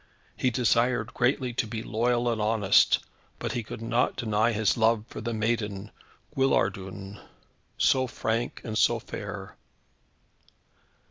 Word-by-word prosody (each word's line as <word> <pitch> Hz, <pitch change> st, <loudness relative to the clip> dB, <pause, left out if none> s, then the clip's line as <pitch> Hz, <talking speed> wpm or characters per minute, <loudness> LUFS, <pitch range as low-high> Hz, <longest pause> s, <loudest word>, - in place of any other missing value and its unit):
He 130 Hz, -, +1 dB
desired 120 Hz, -1 st, +1 dB
greatly 125 Hz, 0 st, +1 dB
to 115 Hz, -, -1 dB
be 110 Hz, 0 st, -5 dB
loyal 120 Hz, +2 st, 0 dB
and 115 Hz, -2 st, 0 dB
honest, 105 Hz, -2 st, +4 dB, 0.4 s
but -, -, -3 dB
he 120 Hz, -, -2 dB
could 110 Hz, +1 st, -8 dB
not 115 Hz, +2 st, +1 dB
deny 110 Hz, 0 st, +1 dB
his 110 Hz, -2 st, +1 dB
love 110 Hz, -1 st, +2 dB
for -, -, -8 dB
the 115 Hz, +1 st, -3 dB
maiden 110 Hz, -3 st, -2 dB, 0.4 s
Guillardun, 100 Hz, -6 st, -1 dB, 0.6 s
so 130 Hz, -1 st, +3 dB
frank 115 Hz, 0 st, -2 dB
and 110 Hz, -2 st, -5 dB
so -, -, +4 dB
fair. -, -, -7 dB
115 Hz, 130 wpm, -27 LUFS, 105-120 Hz, 0.6 s, honest